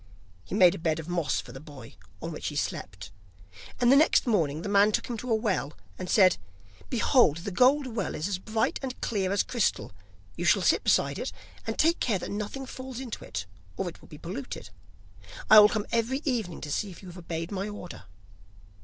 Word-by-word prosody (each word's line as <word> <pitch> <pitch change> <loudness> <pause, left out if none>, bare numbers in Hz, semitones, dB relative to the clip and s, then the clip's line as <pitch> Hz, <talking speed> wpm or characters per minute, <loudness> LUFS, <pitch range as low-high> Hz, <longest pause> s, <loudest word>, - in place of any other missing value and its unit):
He - - -5
made 185 -4 +6
a 195 - -6
bed 160 -1 0
of 160 - -7
moss 170 -5 0
for - - -8
the 135 - -9
boy 140 -5 -12 0.3
on 165 - -4
which 155 - -5
he 150 - -4
slept, 95 -7 -4 0.7
and 245 0 +4
the - - +7
next 305 +3 +4
morning 165 - +1
the - - -4
man 205 +1 +4
took - - 0
him 240 - -3
to 245 +4 -6
a 225 - +4
well, 200 - -1 0.3
and 180 - -5
said: 185 -2 +5 0.5
'Behold, 240 - +3
the 180 +4 -5
gold 260 +8 +4
well 220 -8 -3
is 155 - -2
as 195 -3 -2
bright 220 +3 -1
and 260 -2 -5
clear 195 -4 -1
as 200 - +2
crystal, 235 -5 -1 0.4
you - - -4
shall - - +4
sit - - +3
beside - - +2
it, - - -3 0.4
and 225 - -3
take 330 +2 +3
care 220 -5 +1
that 175 - -6
nothing 210 +6 -4
falls 260 -1 -8
into 255 -4 -6
it, 90 -2 -5 0.3
or - - -2
it - - -8
will - - -16
be - - -11
polluted. - - -7 0.8
I 215 - +12
will 210 0 +8
come 215 -1 -2
every 240 +5 0
evening 225 - -2
to 150 - -6
see 205 - -1
if 180 +1 -12
you 185 - -9
have 175 - -11
obeyed 165 0 -5
my 200 +1 -3
order. 180 - -9
205 Hz, 215 wpm, -28 LUFS, 170-235 Hz, 0.8 s, I